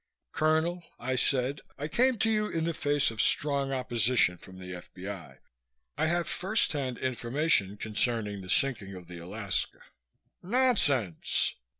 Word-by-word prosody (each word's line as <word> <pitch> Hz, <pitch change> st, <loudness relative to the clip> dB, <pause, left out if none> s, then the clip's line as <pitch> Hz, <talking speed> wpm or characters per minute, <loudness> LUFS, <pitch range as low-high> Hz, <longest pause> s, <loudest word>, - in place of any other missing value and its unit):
"Colonel," 160 Hz, +3 st, +1 dB, 0.2 s
I 130 Hz, +1 st, -1 dB
said. 130 Hz, +2 st, +1 dB, 0.2 s
"I 150 Hz, -, -3 dB
came 250 Hz, +10 st, +2 dB
to 220 Hz, +2 st, +2 dB
you 215 Hz, -1 st, +1 dB
in 165 Hz, -, -1 dB
the 165 Hz, 0 st, 0 dB
face 145 Hz, -3 st, +1 dB
of 110 Hz, -, -1 dB
strong 140 Hz, -2 st, +2 dB
opposition 120 Hz, -7 st, +2 dB
from 95 Hz, -1 st, -13 dB
the 90 Hz, 0 st, -8 dB
F.B.I. 90 Hz, +1 st, -8 dB, 0.6 s
I -, -, +1 dB
have 170 Hz, +1 st, +1 dB
first 205 Hz, +5 st, +1 dB
hand 130 Hz, -5 st, -2 dB
information 125 Hz, -4 st, 0 dB
concerning 105 Hz, -1 st, -1 dB
the 90 Hz, -, -10 dB
sinking 110 Hz, -8 st, +1 dB
of 90 Hz, -2 st, -11 dB
the 90 Hz, -1 st, -9 dB
Alaska." 95 Hz, +2 st, -2 dB, 0.6 s
"Nonsense!" 175 Hz, -, +2 dB
130 Hz, 140 wpm, -29 LUFS, 100-160 Hz, 0.6 s, came